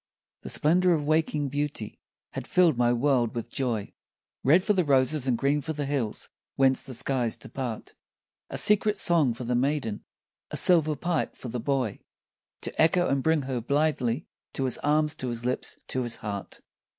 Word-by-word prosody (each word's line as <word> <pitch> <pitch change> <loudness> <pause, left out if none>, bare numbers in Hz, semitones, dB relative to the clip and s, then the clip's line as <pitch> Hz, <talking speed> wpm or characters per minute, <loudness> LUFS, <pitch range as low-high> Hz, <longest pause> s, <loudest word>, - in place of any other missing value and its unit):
The - - -8
splendour 180 +4 +3
of 155 -3 0
waking 155 -2 +1
beauty 145 -6 -4 0.3
had - - -6
filled 175 -5 +4
my 120 0 +2
world 120 -2 +1
with 120 0 -5
joy, 120 -6 -2 0.5
Red 165 +8 +5
for 210 - +2
the 185 -2 +2
roses 135 -1 +2
and 125 -2 +2
green 140 +4 +1
for 160 +3 -4
the 145 -1 -3
hills 135 -7 -2 0.3
whence 135 -1 +3
the 130 - -8
skies 125 -2 -1
depart, 125 -5 -6 0.6
A - - -5
secret 210 0 +3
song 160 -11 +3
for 125 - -7
the 125 +1 -1
maiden, 130 -4 -1 0.5
a - - -2
silver 155 -4 +4
pipe 170 +3 -2
for 125 - -8
the 120 - -4
boy, 130 -3 -1 0.6
To - - -2
echo 175 +2 +3
and 135 0 +1
bring 160 0 +2
her 130 -2 -3
blithely, 140 -1 0 0.3
to 135 - -2
his 130 - 0
arms, 150 +1 +2
to 130 - -3
his 120 -1 -3
lips, 125 +1 -2
to 130 - -1
his 120 -2 -1
heart. 100 -2 -6
135 Hz, 180 wpm, -27 LUFS, 120-155 Hz, 0.6 s, Red